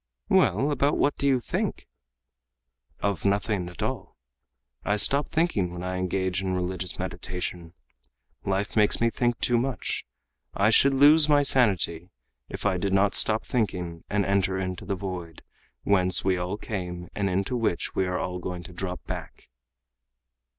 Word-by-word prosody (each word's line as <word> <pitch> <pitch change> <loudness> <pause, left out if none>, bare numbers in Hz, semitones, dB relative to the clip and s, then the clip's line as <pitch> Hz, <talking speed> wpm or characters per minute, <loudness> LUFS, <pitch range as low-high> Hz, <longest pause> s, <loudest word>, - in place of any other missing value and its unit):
"Well, 145 +3 +3
about 140 +1 +1
what 145 - +2
do 140 - 0
you 135 -2 +3
think?" 120 - -3 1.1
"Of 100 -4 -1
nothing 100 -2 0
at 90 - -7
all. - - -4 0.7
I 105 - +1
stop 140 +7 +4
thinking 135 - 0
when 90 0 -7
I 90 0 -3
engage 95 0 -1
in 95 -1 -2
religious 90 0 -3
meditation. 90 -2 -5 0.7
Life 100 +1 -2
makes 105 -2 +4
me 115 0 +2
think 120 -1 0
too 120 -1 +2
much. 130 0 -2 0.5
I 100 +3 +3
should 135 +4 +4
lose 150 +3 +6
my 145 -1 +5
sanity, 95 - +2 0.4
if - - -7
I 95 -2 +2
did 95 +1 -1
not 100 +1 +3
stop 110 0 +3
thinking 90 -8 -2
and 100 -1 +1
enter 95 -1 +1
into 95 -1 -4
the 100 +1 -2
'void', 90 -4 -7 0.4
whence 95 -2 +3
we 95 -1 +3
all 90 +3 -3
came 90 -5 -5
and 100 -1 -1
into 95 +6 -1
which 110 -7 -1
we 95 - 0
all 90 0 -2
are - - -7
going 90 0 -5
to 90 -1 -11
drop 90 0 -5
back." - - -8
95 Hz, 160 wpm, -26 LUFS, 90-110 Hz, 1.1 s, lose